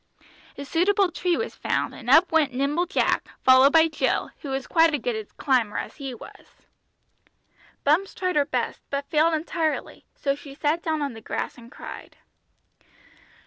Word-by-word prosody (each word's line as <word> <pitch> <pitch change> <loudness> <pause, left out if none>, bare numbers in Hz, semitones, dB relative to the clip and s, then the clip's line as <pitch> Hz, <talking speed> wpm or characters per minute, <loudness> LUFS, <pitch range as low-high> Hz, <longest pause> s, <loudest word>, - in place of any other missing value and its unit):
A 280 - -6
suitable 375 +5 +2
tree 350 0 0
was 460 - -3
found, - - -2
and 235 - -8
up 320 +7 +6
went 310 -5 +2
nimble 290 +7 0
Jack, 390 - 0 0.2
followed 260 +2 +7
by 325 0 +6
Jill, 315 - -1
who 285 - -7
was 270 -1 -3
quite 325 0 +4
as - - -3
good 240 0 -2
a 220 -1 -5
climber 250 -7 +1
as - - -5
he 275 -3 -5
was. - - -15 1.2
Bumps 330 +7 +2
tried 365 -1 -2
her 290 -1 +3
best, - - -3
but 280 0 -3
failed 320 +1 +3
entirely, 320 0 -3
so 275 - 0
she 280 0 -11
sat 310 +3 0
down 315 -3 -1
on 280 -3 -3
the 225 - -11
grass - - -4
and 235 0 -15
cried. - - -10
295 Hz, 175 wpm, -25 LUFS, 270-330 Hz, 1.2 s, followed